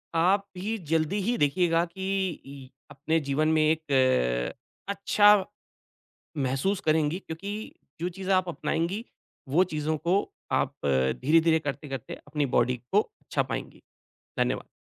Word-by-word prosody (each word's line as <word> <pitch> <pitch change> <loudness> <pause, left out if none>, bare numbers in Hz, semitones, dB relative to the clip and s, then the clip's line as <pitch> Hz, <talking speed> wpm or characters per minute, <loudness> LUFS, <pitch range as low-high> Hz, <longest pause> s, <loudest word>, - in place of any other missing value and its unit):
आप 190 +4 +3
ही 215 +5 -2
जल्दी 165 +5 +1
ही 235 +5 0
देखिएगा 165 +3 +2
कि 190 +2 -2 0.2
इ 135 -1 -10 0.2
अपने 160 +4 0
जीवन 145 +2 0
में 155 - +3
एक 130 - +2 0.4
अच्छा 205 +1 +5 1.0
महसूस 135 +9 0
करेंगी 155 +2 +2
क्योंकि 200 +6 -6 0.3
जो 175 - 0
चीज़ 190 +2 -7
आप 185 -1 +3
अपनाएँगी, 170 +6 -2 0.5
वो 170 +7 +4
चीज़ों 155 +1 -1
को 180 +6 +2 0.3
आप - - +1 0.5
धीरे-धीरे 160 +3 +4
करते-करते 140 -4 -5
अपनी 145 0 0
बॉडी 125 +1 +2
को 205 - +5
अच्छा 425 - -3
पाएँगी। - - -6 0.6
धन्यवाद। - - 0
160 Hz, 125 wpm, -27 LUFS, 145-190 Hz, 1.0 s, अच्छा